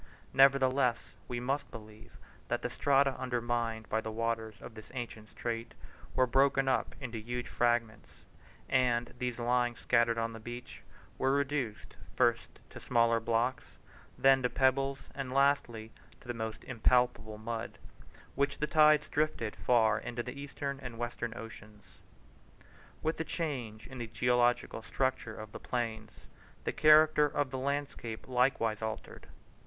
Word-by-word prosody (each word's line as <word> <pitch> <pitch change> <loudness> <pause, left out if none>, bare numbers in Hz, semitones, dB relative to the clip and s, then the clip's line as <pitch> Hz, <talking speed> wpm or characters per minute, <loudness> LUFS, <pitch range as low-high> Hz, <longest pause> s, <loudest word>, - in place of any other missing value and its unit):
Nevertheless, 135 -2 +4
we 120 - -3
must 135 +4 -2
believe 110 +1 -12 0.3
that - - -2
the - - -2
strata 140 -1 +3
undermined 120 -3 -2
by 110 - 0
the 110 - -5
waters 110 -1 -2
of - - -10
this 110 -1 -12
ancient 115 -3 -6
strait, 115 -1 -4 0.4
were 130 - +4
broken 135 +1 +3
up 130 - 0
into 120 -5 -5
huge 120 +2 -4
fragments, 120 -3 0 0.6
and 120 -2 +1
these 125 -2 -2
lying 120 0 +1
scattered 115 -1 +2
on 115 0 -1
the 115 - -8
beach 120 +2 -8 0.4
were 135 +1 +2
reduced 135 -6 -2 0.2
first - - +1
to - - -9
smaller 115 -1 +2
blocks, 115 +3 -1 0.4
then 135 0 +5
to 125 - +1
pebbles 135 +1 +2 0.2
and 135 -2 -5
lastly 120 -5 +2 0.3
to - - -18
the 120 - -2
most 110 -1 -5
impalpable 120 -3 +1
mud, 110 +1 -5 0.6
which 140 +1 0
the 150 - 0
tides 150 -1 +5
drifted 150 -8 -1
far 115 -3 +3
into 120 0 -4
the 125 - -6
Eastern 140 0 -5
or 120 -2 -7
Western 120 -1 -4
Ocean. 110 -2 -10 1.2
With 160 +1 0
the 160 - -1
change 135 -10 -4
in 130 -1 -9
the 120 - -4
geological 120 0 +1
structure 120 +2 -2
of 110 -1 -8
the - - -8
plains 110 -3 -4 0.4
the - - -1
character 155 -1 +6
of 145 -2 -1
the 130 - -3
landscape 140 -5 -3
likewise 125 -4 +1
altered. 110 0 -6
120 Hz, 145 wpm, -32 LUFS, 115-135 Hz, 1.2 s, character